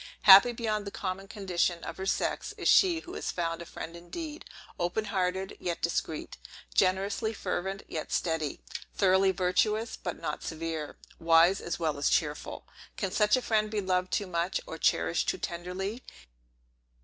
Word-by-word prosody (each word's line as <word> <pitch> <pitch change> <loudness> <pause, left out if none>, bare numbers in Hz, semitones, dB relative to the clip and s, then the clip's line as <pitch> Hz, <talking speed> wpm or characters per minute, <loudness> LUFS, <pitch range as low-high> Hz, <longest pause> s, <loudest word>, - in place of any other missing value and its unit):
Happy 200 +4 +10
beyond 220 -3 -2
the 200 - -5
common 195 0 -4
condition 180 -4 -1
of - - -6
her 190 0 -4
sex, - - -1
is - - -2
she 345 -4 +5
who 360 - -10
has - - -4
found 165 -1 -2
a 170 - -8
friend 165 +1 -7
indeed; 300 - -7 0.3
open 175 +5 -1
hearted, 190 -1 -1
yet 175 -2 -3
discreet; 165 -2 -2 0.4
generously 195 +4 +1
fervent, 195 -1 -3
yet 155 -2 -5
steady; 160 -4 -1 0.4
thoroughly 190 0 +4
virtuous, 200 +5 +1
but - - -5
not - - -4
severe; 160 -2 -4 0.2
wise, 165 +3 +5
as 170 - -3
well 155 -4 -1
as 145 - +2
cheerful! 150 -2 -1 0.3
Can 195 -3 -2
such 210 +3 +3
a 255 - -3
friend 215 -1 +1
be 215 -1 -1
loved 185 -1 0
too 205 - 0
much, 175 0 -1
or - - -7
cherished - - +2
too 370 - -1
tenderly? 190 - -4
190 Hz, 160 wpm, -29 LUFS, 170-210 Hz, 0.4 s, Happy